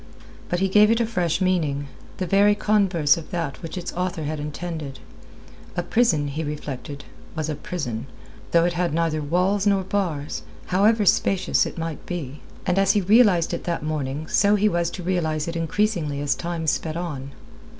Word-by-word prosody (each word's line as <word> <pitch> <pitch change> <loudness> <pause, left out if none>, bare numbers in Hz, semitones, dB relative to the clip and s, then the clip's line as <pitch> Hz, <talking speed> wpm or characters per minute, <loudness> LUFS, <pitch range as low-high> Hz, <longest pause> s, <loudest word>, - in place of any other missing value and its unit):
But 175 +1 -1
he 195 - +3
gave 210 +2 +5
it 230 +1 +3
a 235 - +2
fresh 180 -6 -1
meaning, 155 -7 0 0.3
the 185 - -2
very 200 +2 +4
converse 195 -7 +3
of 165 - -8
that 165 -6 -3
which 165 +1 -6
its 180 0 -5
author 180 -3 -2
had 150 +1 -3
intended. 150 -2 -5 0.8
A 175 - 0
prison, 175 -8 +2
he 155 +3 -3
reflected, 145 -1 -6 0.3
was 155 -1 -2
a - - -1
prison, 135 -9 -4 0.4
though 170 0 +4
it 175 - +1
had 175 -3 0
neither 165 -2 0
walls 185 +7 +1
nor 195 -1 +3
bars, 165 - -2 0.2
however 210 +3 +3
spacious 190 +1 +3
it - - -9
might 165 -2 -4
be. 150 -5 -5 0.3
And 185 0 +2
as 195 0 +4
he 205 - +2
realized 195 -4 +4
it 170 - -4
that 170 -3 -2
morning 150 -1 -3
so 205 +1 +4
he 210 +1 +3
was 170 -3 +1
to 180 - -7
realize 160 -4 -1
it 170 - -4
increasingly 165 -3 0
as 145 -1 +1
time 170 -1 -4
sped 155 +1 -1
on. 145 -6 -5
170 Hz, 180 wpm, -23 LUFS, 150-190 Hz, 0.8 s, gave